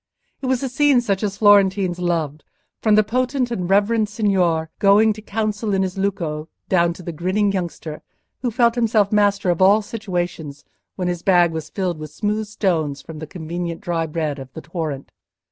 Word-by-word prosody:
It 265 - -3
was 260 0 0
a - - 0
scene 275 +1 +3
such 200 -5 -1
as 200 -2 -2
Florentines 195 -3 +4
loved, 160 -4 -1 0.4
from 215 -2 +4
the 215 - +5
potent 250 +3 -1
and 185 -6 -3
reverend 210 +2 +2
signor 180 -7 +1
going 210 +2 +5
to 215 - -11
council 215 -1 -2
in 190 - +2
his 185 -1 -3
lucco, 170 -6 -2 0.2
down 170 -2 +3
to 180 - -12
the 170 - -4
grinning 185 +5 0
youngster, 170 -4 -4 0.4
who 245 - 0
felt 235 0 +3
himself 220 -4 +2
master 205 -3 +2
of 175 - -2
all 205 +3 +5
situations 175 -9 -4 0.3
when 180 -2 -2
his 175 -1 -2
bag 175 -3 +4
was 160 -2 -5
filled 180 -5 -2
with 155 0 -7
smooth 210 +6 -2
stones 165 -9 -1
from 160 -2 -9
the 155 - -7
convenient 170 0 -5
dry 165 -2 -1
bed 155 -2 -3
of 130 -1 -9
the - - -7
torrent. 155 -4 -5
190 Hz, 185 wpm, -21 LUFS, 165-215 Hz, 0.4 s, the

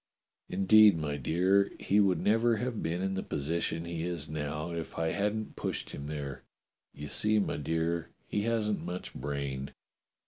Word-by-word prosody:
Indeed, 100 +1 +6
my 75 -2 -2
dear, 95 +8 +2
he 100 - +2
would 95 -5 +4
never 115 +2 +3
have 120 -1 -2
been 85 +3 -1
in 95 0 0
the 95 - -1
position 80 +2 -2
he 85 -1 -4
is 85 -3 -3
now 75 +2 -3
if 85 -1 -5
I 80 0 +1
hadn't 105 +2 -1
pushed - - -3
him 70 - -6
there. 70 -3 -5 0.5
You 75 - -8
see, 110 +7 +2
my 105 - 0
dear, 80 +2 -1 0.2
he 105 - 0
hasn't 110 -2 0
much 90 +1 -5
brain. 70 -1 -4
85 Hz, 165 wpm, -31 LUFS, 75-105 Hz, 0.5 s, Indeed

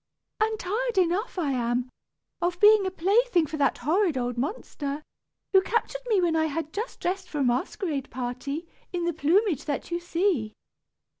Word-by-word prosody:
"And 440 0 +1
tired 445 +4 -2
enough 370 +4 +1
I 310 -6 0
am, 245 0 0 0.5
of 350 0 0
being 420 -1 +7
a - - +1
plaything 385 0 +3
for 310 +1 -5
that 280 -3 +2
horrid 330 +3 +1
old 245 -1 -1
monster, 285 - -3 0.5
who 385 - +7
captured 470 +4 -1
me 430 -5 +3
when 345 -2 +2
I 315 0 +3
had 315 +1 -4
just 440 +4 -4
dressed 375 +1 -2
for 300 - -5
a 285 - +2
masquerade 275 - -1
party, 260 +6 -4 0.2
in 350 -1 -2
the 345 - 0
plumage 325 - +2
that 290 +3 -3
you 345 - 0
see. 345 - 0
345 Hz, 170 wpm, -27 LUFS, 280-390 Hz, 0.5 s, being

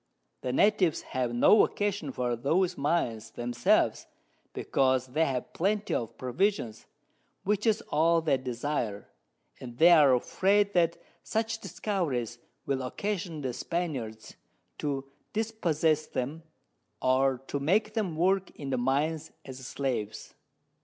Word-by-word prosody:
The 125 - -2
Natives 190 +2 +3
have 125 -2 0
no 120 - +6
occasion 200 -8 -1
for 125 -2 -1
those 170 +9 +1
Mines 120 -7 -1
themselves, 120 +1 +1 0.4
because 130 -2 +1
they 155 +6 +1
have 130 -4 -3
Plenty 205 +4 0
of 115 - -3
Provisions, 130 - -1 0.6
which 210 +3 0
is 220 -1 +3
all 165 +2 +3
they 155 -4 +1
desire, 125 -4 -3 0.5
and 120 -2 -9
they 170 +5 +7
are 145 -6 +7
afraid 200 +10 +2
that 170 -1 +2 0.2
such 225 0 -2
Discoveries 160 - -2 0.3
will 135 -1 -1
occasion 175 +3 -3
the 130 -3 -3
Spaniards 125 -9 -4 0.4
to 140 -2 -2 0.3
dispossess 165 -9 0
them, 135 +5 -4 0.6
or 130 +1 +2
to 140 - -3
make 205 +9 +1
them 205 -8 -1
work 190 +3 +2
in 140 -2 -6
the 130 - 0
Mines 145 +5 0
as 130 -1 -8
Slaves. 120 -6 -3
150 Hz, 125 wpm, -29 LUFS, 130-185 Hz, 0.6 s, they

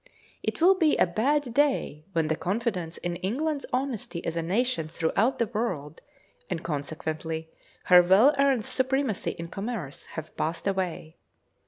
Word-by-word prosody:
It - - -3
will 360 +4 +7
be 330 -5 +3
a - - +5
bad 250 +8 0
day 265 - +1
when 165 -2 +1
the 160 - +1
confidence 185 -3 -2
in 175 0 -3
England's 280 - -2
honesty 250 -9 -2
as 165 - -2
a 165 - 0
nation 195 0 0
throughout 180 +10 +1
the 235 - +2
world, 185 -10 -3 0.5
and 175 -3 -3
consequently 160 +1 -4 0.3
her 180 -1 +8
well 195 +11 +6
earned 270 -5 +3
supremacy 260 -3 0
in 170 0 -5
commerce, 195 - -5
have 160 0 -6
passed 165 +2 -2
away. 185 -5 -2
190 Hz, 150 wpm, -27 LUFS, 165-255 Hz, 0.5 s, her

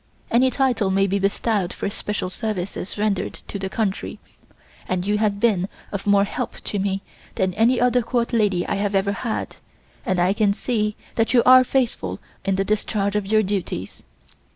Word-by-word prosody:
Any 255 +3 +4
title 255 -7 +1
may 195 +1 +3
be 200 +1 0
bestowed 200 -1 0
for - - -3
special 200 -3 -3
services 200 -3 -4
rendered 205 -2 0
to 200 - -5
the 190 0 -3
country 200 -2 -2 0.7
and 180 0 -1
you 210 +1 +1
have 205 -2 +1
been 200 -4 +2 0.2
of 200 0 -5
more 200 -1 +5
help 200 - -4
to 205 - -3
me 195 0 -1 0.3
than 185 -1 0
any 230 +5 +3
other 245 0 +3
Court 235 0 -1
lady 205 -6 +2
I - - -1
have 200 0 -1
ever 195 +1 +2
had, 220 +2 -3 0.5
and 185 -1 0
I 180 +2 +3
can 205 -1 +2
see 210 -1 -1 0.2
that 225 +2 +1
you 240 - +6
are 255 0 +9
faithful 235 - -1 0.2
in 195 - +1
the 195 +1 0
discharge 205 -1 0
of 210 -2 0
your 215 +1 +3
duties. 185 - -3
205 Hz, 180 wpm, -22 LUFS, 195-225 Hz, 0.7 s, are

